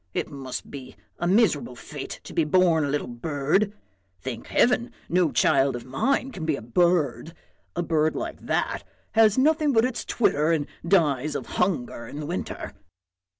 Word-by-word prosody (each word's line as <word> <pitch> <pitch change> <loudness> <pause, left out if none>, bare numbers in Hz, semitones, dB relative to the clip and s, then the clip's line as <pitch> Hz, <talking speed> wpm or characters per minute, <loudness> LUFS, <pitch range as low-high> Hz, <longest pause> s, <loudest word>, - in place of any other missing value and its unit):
it - - -2
must 135 -3 -6
be 130 -2 -9 0.2
a 175 - 0
miserable 180 - +2
fate 145 +3 -7
to - - -10
be 165 - +2
born 165 0 +3
a - - -2
little 145 +1 -1
bird! 145 - 0 0.5
Thank 120 +2 -6
heaven! 240 0 +2 0.2
no 175 -2 +2
child 135 -3 +3
of 120 - -7
mine 260 - 0
can 185 -9 -7
be 155 -2 +1
a - - -7
bird; 160 +1 +1 0.4
a 175 - 0
bird 160 -1 +1
like - - -4
that - - -1 0.3
has 220 -1 +4
nothing 300 +1 +3
but 225 0 +4
its 250 -2 -3
twitter 155 -8 +2
and 150 -3 0 0.2
dies 150 -5 +2
of - - -3
hunger 135 -10 -1
in 145 - -7
the 150 - -4
winter." 175 +5 -5
155 Hz, 170 wpm, -25 LUFS, 140-190 Hz, 0.5 s, has